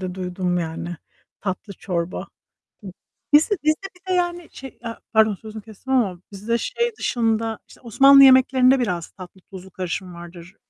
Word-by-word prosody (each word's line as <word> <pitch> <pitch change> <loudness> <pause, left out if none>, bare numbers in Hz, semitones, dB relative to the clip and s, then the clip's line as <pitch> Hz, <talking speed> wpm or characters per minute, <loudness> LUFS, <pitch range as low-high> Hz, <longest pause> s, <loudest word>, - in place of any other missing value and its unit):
de 185 -1 -5
duydum 180 -1 -2
yani. 170 +1 -5 0.4
Tatlı 200 +1 -5
çorba. 175 -2 -4 1.1
Bizde 315 +8 +5
bizde, 310 0 +2 0.2
bir 370 +1 -14
de - - +2
yani 350 -1 -2
şey, 270 0 -9
e 230 - -11
ya 230 - -7
pardon 220 -2 +4
sözünü 220 +1 -10
kestim 225 +5 -7
ama 200 -9 +1
bizde 210 +4 -2
şey 475 - -2
dışında 225 -2 -1
işte - - -18
Osmanlı 275 +4 +6
yemeklerinde 260 0 +5
biraz 180 -9 -2
tatlı 185 0 -13
tuzlu 190 0 -12
karışımı 180 0 -5
vardır. 175 +2 -12
215 Hz, 155 wpm, -22 LUFS, 180-260 Hz, 1.1 s, Osmanlı